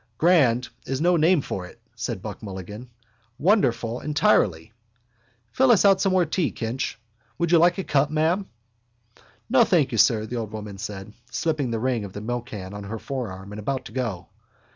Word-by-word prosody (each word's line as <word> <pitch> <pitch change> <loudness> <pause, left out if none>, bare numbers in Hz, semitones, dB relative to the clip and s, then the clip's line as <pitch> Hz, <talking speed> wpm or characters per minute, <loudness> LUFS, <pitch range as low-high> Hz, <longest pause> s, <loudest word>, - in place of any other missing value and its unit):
—Grand 130 -8 +3 0.2
is 135 0 -2
no 175 +3 +3
name 165 0 +4
for 90 -7 -5
it, - - -17 0.2
said - - -4
Buck - - -7
Mulligan. 105 +4 -8 0.5
Wonderful 125 - +2
entirely. 145 - +1 0.8
Fill 265 0 +3
us 220 -4 +5
out 195 -1 +5
some 195 - +2
more 185 -2 +3
tea, 160 0 0
Kinch. 115 +1 -3 0.4
Would 170 -1 0
you 170 - +6
like 175 +2 +4
a 190 - -2
cup, 145 -2 +2
ma'am? 160 +6 0 1.0
—No, 250 0 +5
thank 170 - +2
you, 115 - -1
sir, 110 +1 +4
the 120 +3 -5
old 110 -2 -4
woman 105 -2 -7
said, 100 +1 -7 0.2
slipping 145 +1 -1
the 115 - -1
ring 125 -2 0
of 100 -2 -8
the - - -6
milkcan 110 -4 -5
on 105 0 -7
her 110 +3 -5
forearm 105 -7 -6
and 105 - -7
about 130 +5 -3
to - - -9
go. 110 -8 -4
125 Hz, 185 wpm, -24 LUFS, 105-165 Hz, 1.0 s, you